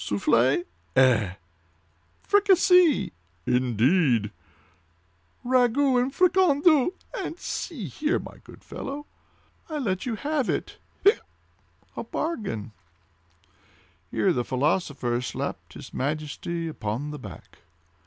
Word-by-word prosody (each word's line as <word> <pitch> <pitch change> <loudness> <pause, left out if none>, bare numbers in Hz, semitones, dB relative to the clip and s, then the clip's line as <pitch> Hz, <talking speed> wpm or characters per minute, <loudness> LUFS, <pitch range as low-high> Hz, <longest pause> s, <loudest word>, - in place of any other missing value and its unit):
"Soufflee." 120 - +2 0.3
"Eh!" 115 -8 +4 0.9
"Fricassee." 365 -5 +4 0.3
"Indeed!" 125 - +2 1.1
"Ragout 255 +1 +3
and 255 +2 -1
fricandeau—and 350 0 +2
see 305 - -5
here, 300 - -1
my - - -9
good - - -15
fellow! 285 +2 -6 0.6
I'll 305 -2 -3
let 190 -3 -2
you 235 - -1
have 285 +1 -1
it—hiccup!—a 410 +4 -3
bargain." 200 - -3 1.4
Here - - +1
the 125 - 0
philosopher 130 -2 0
slapped 125 - -5
his - - -11
Majesty 155 +4 -3
upon 130 0 -4
the 150 - -7
back. - - -12
190 Hz, 90 wpm, -26 LUFS, -, 1.4 s, Eh